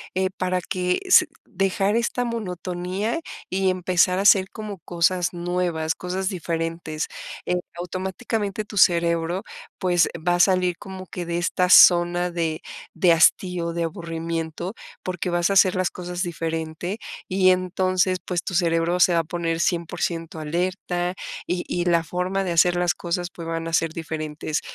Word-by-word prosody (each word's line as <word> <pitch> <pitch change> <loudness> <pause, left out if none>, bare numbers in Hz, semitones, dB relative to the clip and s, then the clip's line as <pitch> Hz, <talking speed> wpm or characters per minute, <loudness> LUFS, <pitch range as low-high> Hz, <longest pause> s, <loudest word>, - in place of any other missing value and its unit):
eh, 190 0 +1
para 185 0 0
que 180 0 -1
se 365 -2 +7 0.2
dejar 195 +1 0
esta 235 +1 0
monotonía 190 - -3 0.3
y 190 0 +1
empezar 180 0 +2
a - - 0
hacer 190 -2 +5
como 210 -4 -7
cosas 175 +1 0
nuevas, 175 -2 -1
cosas 185 +1 -3
diferentes. 165 -3 -3 0.4
Eh, 180 - 0 0.2
automáticamente, 195 +4 -3
tu 205 - -9
cerebro, 170 0 +3 0.3
pues, 175 -3 +3
va 175 +2 +1
a - - -2
salir 180 -1 +3
como 190 -1 -9
que 180 - -5
de 170 0 -2
esta 180 +1 +1
zona 175 0 +6
de 165 -2 -2 0.3
de 175 -2 +4
hastío, 170 0 +3
de 170 0 -2
aburrimiento, 165 +1 -4 0.3
porque 180 -1 -3
vas 175 +1 +1
a - - +3
hacer 190 -1 +5
las 185 -1 +1
cosas 180 0 -5
diferentes 165 +2 -3 0.3
y 185 0 +4
entonces, 185 0 +1
pues, 180 -1 -2
tu 185 - -4
cerebro 165 -1 +2
se 175 - +5
va 170 - +3
a - - 0
poner 165 0 -2
100% 170 -2 -2
alerta 175 +2 -2 0.3
y 180 0 -2
y 175 0 -1
la 170 -1 +3
forma 180 +3 -2
de 180 - -2
hacer 175 +1 +4
las 175 0 +1
cosas, 175 0 -3
pues, 165 -1 -8
van 165 0 -3
a 165 - -5
ser 165 -1 +2
diferentes. 155 -1 -4
175 Hz, 160 wpm, -23 LUFS, 170-185 Hz, 0.4 s, se